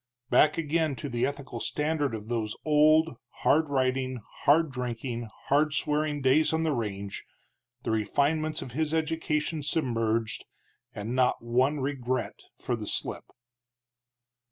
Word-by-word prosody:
Back 150 +6 +5
again 160 -2 0
to 140 +4 -5
the 120 -1 +1
ethical 140 -4 -6
standard 150 -1 -1
of 105 0 -8
those 110 -3 -2
old, 155 -1 +4 0.3
hard 155 0 +4
riding, 130 -1 0 0.3
hard 155 +1 +5
drinking, 120 -2 -4 0.2
hard 150 +2 +3
swearing 150 -2 0
days 135 +4 +4
on 160 0 +1
the 160 -2 +1
range, 100 -5 -4 0.6
the - - -1
refinements 145 +8 0
of 125 - -9
his 155 +4 0
education 160 -1 -1
submerged, 115 -7 0 0.5
and 110 +1 -5
not 125 -2 +2
one 130 +5 +2
regret 130 -3 -2 0.2
for - - -2
the - - -6
slip. - - -3
140 Hz, 130 wpm, -28 LUFS, 120-155 Hz, 0.6 s, Back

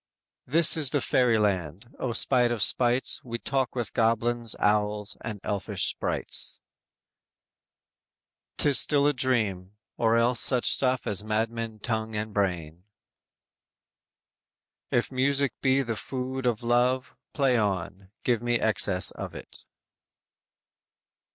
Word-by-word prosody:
"This 160 +5 +4
is 150 -4 +4
the 145 - 0
fairy 125 -4 +2
land; 100 - -2
O 130 - -2
spite 120 +1 +2
of 115 -4 0
spites 125 +1 +3
We 120 -2 -5
talk 130 +1 -2
with 120 -4 -4
goblins, 115 0 0
owls, 105 0 0
and 110 -2 -6
elfish 100 -3 -2
sprites. - - 0 2.0
'Tis 140 -4 +3
still 145 -2 +2
a 145 - +3
dream, 105 -8 -1 0.2
or 115 0 +2
else 120 +1 +2
such 125 -2 +3
stuff 130 -2 0
as 105 0 +2
Madmen 110 0 -3
tongue 110 -1 -3
and 105 0 -4
brain!" 90 -4 -3 2.1
_"If 120 - 0
music 140 +1 0
be 135 0 +2
the 115 -3 -4
food 130 +2 -4
of 120 -1 -1
love, 125 +2 0 0.2
play 135 -3 +1
on; 95 -3 -3
Give 120 -3 0
me 120 -1 0
excess 105 -4 +2
of - - -8
it." - - -12
115 Hz, 125 wpm, -26 LUFS, 105-130 Hz, 2.1 s, This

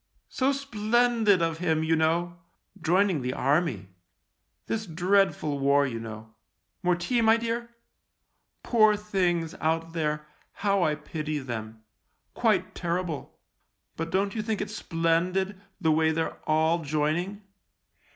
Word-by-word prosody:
" - - -49
So 265 +1 +4
splendid 235 -6 +2
of 165 0 -1
him, 160 -3 +1
you 160 0 +2
know, 170 +2 0 0.4
join 185 +5 +3
ing 155 -6 -1
the 125 +1 -2
Army. 135 - 0 0.8
This 220 -1 -3
dreadful 175 -4 +1
war, 140 +1 +4
you 115 -4 -3
know. 110 0 -9 0.5
More 180 -1 +2
tea, 235 +8 0
my 225 0 +5
dear. 235 +1 -3 0.9
Poor 215 -3 +4
things, 180 -6 0
out 165 +1 0
there 150 -2 -1 0.2
— - - -36
how 200 -1 +3
I 155 -3 +2
pity 155 0 -4
them. 110 -5 -6 0.5
Quite - - +1
terrible. 170 -3 -3 0.6
But 165 +1 -4
don't 195 +2 0
you 220 - -2
think 215 0 -2
it's 205 +1 -4
splendid, 180 +3 0 0.2
the 160 -4 +2
way 160 +1 +3
they're 160 0 -2
all 160 +2 +2
joining 155 +7 -1
170 Hz, 140 wpm, -27 LUFS, 155-200 Hz, 0.9 s, my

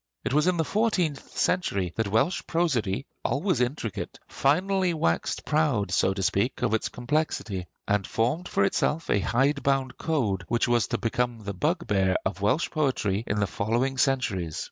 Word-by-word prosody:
It - - -1
was 150 +3 +3
in 180 -1 +2
the 160 - +1
fourteenth 185 -9 -1
century 100 - 0
that 115 -2 0
Welsh 115 - +1
prosody, 140 - 0 0.2
always 145 - 0
intricate, 125 -4 -3
finally 180 +5 +1
waxed 85 - 0
proud, 140 - +1
so 95 - +3
to 95 - -2
speak, 100 +7 0
of - - +1
its 110 - 0
complexity, 120 - -2 0.2
and 100 -1 +1
formed 130 +11 0
for - - +1
itself 155 +10 0
a 100 - +3
hide 135 +8 +1
bound 135 -2 0
code 110 - 0
which 120 +1 +1
was 120 -3 +2
to 120 - -1
become 115 +1 -1
the 100 0 -4
bugbear 100 - +1
of 100 +1 -2
Welsh 130 +11 +1
poetry 125 - 0
in 105 - 0
the 100 - +2
following 120 +8 -1
centuries. 100 - 0
125 Hz, 165 wpm, -27 LUFS, 100-155 Hz, 0.2 s, was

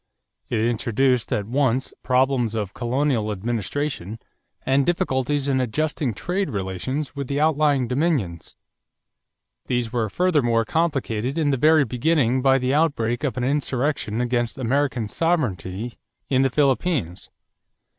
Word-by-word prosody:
It 110 -2 0
introduced 120 +1 +1
at 100 - 0
once 130 +1 0
problems 130 -3 +1
of 105 -3 -3
colonial 125 -3 0
administration 115 +1 -3 0.5
and 135 +1 +3
difficulties 145 -4 0
in 130 -2 +2
adjusting 140 0 -1
trade 185 - -2
relations 115 - -3
with 140 -2 -4
the 140 +2 -1
outlying 150 -4 +2
dominions. 125 - -1 1.1
These 120 -2 -1
were 115 -3 0
furthermore 125 - +2
complicated 135 -4 -1
in 150 -3 +2
the - - +2
very 155 +2 +5
beginning 130 0 +1
by 135 0 +4
the 130 0 0
outbreak 140 -6 +1
of 135 -3 -1
an 125 - -1
insurrection 135 -3 -1
against 120 -1 -1
American 130 -2 0
sovereignty 120 - -2 0.3
in 130 -1 +3
the 135 - +3
Philippines. 135 - 0
130 Hz, 125 wpm, -23 LUFS, 115-145 Hz, 1.1 s, very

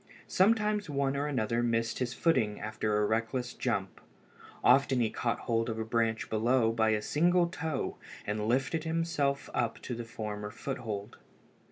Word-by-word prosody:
Sometimes 210 -1 +2
one 140 -1 0
or 145 +1 -1
another 120 -4 0
missed 115 -1 0
his 125 -2 -1
footing 125 -7 +1
after 110 0 -1
a 105 - +2
reckless 115 +3 -1
jump. 100 -6 -2 0.6
Often 135 0 +5
he 115 -2 +1
caught 120 -1 -1
hold 115 -1 0
of 110 - -3
a 110 - -2
branch 115 0 0
below 115 +1 +2
by 110 -1 +2
a 105 -1 +1
single 175 +3 +3
toe 160 -4 -3 0.3
and 105 +1 -2
lifted 135 +6 +1
himself 160 -4 0
up 115 -1 0
to 120 -2 -4
a - - -5
firmer 105 -2 -5
foothold. 110 -4 -5
120 Hz, 160 wpm, -31 LUFS, 110-140 Hz, 0.6 s, Often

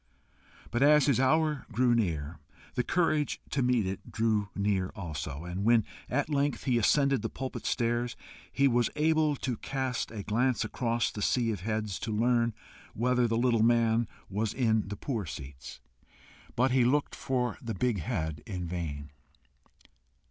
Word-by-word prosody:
But 120 - 0
as 150 0 +6
his 140 -4 +3
hour 150 +2 +2
drew 120 +2 +3
near, 80 -8 -1 0.3
the - - +1
courage 155 -1 +1
to 140 - +1
meet 125 -4 +2
it 95 +1 -5
drew 110 -2 +1
near 100 -2 0
also, 80 -5 -5
and 90 +3 -4
when 115 0 +4 0.2
at 145 +3 0
length 145 -1 0
he 125 -3 +2
ascended 140 +2 +3
the - - -2
pulpit 130 -1 -5
stairs, 120 0 0 0.4
he 140 0 +3
was 120 -2 +2
able 155 -1 +2
to 130 -3 -3
cast 130 -2 -2
a 110 -3 -6
glance 120 +2 +1
across 115 +1 -1
the 105 - -6
sea 115 +1 +2
of 105 - -3
heads 110 0 -2
to 110 - -4
learn 115 +1 +2 0.4
whether 125 +1 +2
the 115 0 0
little 120 -2 +3
man 115 0 +3 0.2
was 105 +2 -2
in 110 -5 +2
the 105 0 -5
poor 110 - -3
seats. 65 -2 -8 0.8
But 130 +2 +2
he 130 -1 +4
looked 140 +4 +1
for 125 -3 -2
the 115 -4 -4
big 125 -5 0
head 80 -7 -3
in 90 -5 -4
vain. 75 -5 -5
115 Hz, 165 wpm, -30 LUFS, 105-130 Hz, 0.8 s, as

